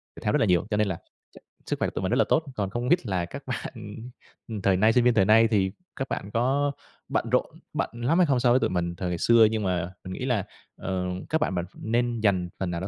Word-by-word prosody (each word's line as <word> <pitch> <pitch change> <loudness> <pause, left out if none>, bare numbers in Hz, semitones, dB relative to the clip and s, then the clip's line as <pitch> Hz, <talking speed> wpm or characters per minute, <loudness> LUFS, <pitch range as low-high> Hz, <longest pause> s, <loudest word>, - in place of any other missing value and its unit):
thể - - -10
thao - - +1
rất - - +3
là - - +3
nhiều, 90 -2 +2
cho 105 - +1
nên 105 - +2
là 95 -3 -2 0.3
ch - - -18 0.3
sức - - -1
khỏe - - +1
của - - -4
tụi - - -2
mình 95 - 0
rất 120 - +2
là - - +4
tốt, 160 - +3
còn 100 -4 -1
không 120 +5 -3
biết 175 -5 +3
là 95 -5 -1
các 110 +10 -9
bạn 110 -3 -6 0.6
thời 95 -2 +3
nay 110 +3 +4
sinh 125 0 +4
viên 125 -1 +4
thời 95 -4 +4
nay 110 +2 +6
thì 95 -3 +2 0.2
các 135 - -3
bạn 100 - -4
có 135 +5 +1 0.4
bận - - -1
rộn - - +3 0.3
bận - - -1
lắm 120 +8 0
hay 180 - +6
không 135 -3 +2
so 120 -1 +3
với 125 - +5
tụi - - +1
mình 85 -1 -1
thời 90 +1 -3
ngày 85 - -2
xưa 115 +3 +6
nhưng 110 -2 -1
mà 90 -1 -1
mình 95 - -6
nghĩ 125 - -4
là, 115 -7 0 0.3
ờ, 95 -1 -2 0.2
các 160 0 +1
bạn 95 - 0
mà 90 - 0
nên 120 +1 -1
dành 95 -5 +2
phần 95 -2 -2
nào 85 0 -3
đó 95 - -3
110 Hz, 280 wpm, -26 LUFS, 95-120 Hz, 0.6 s, nay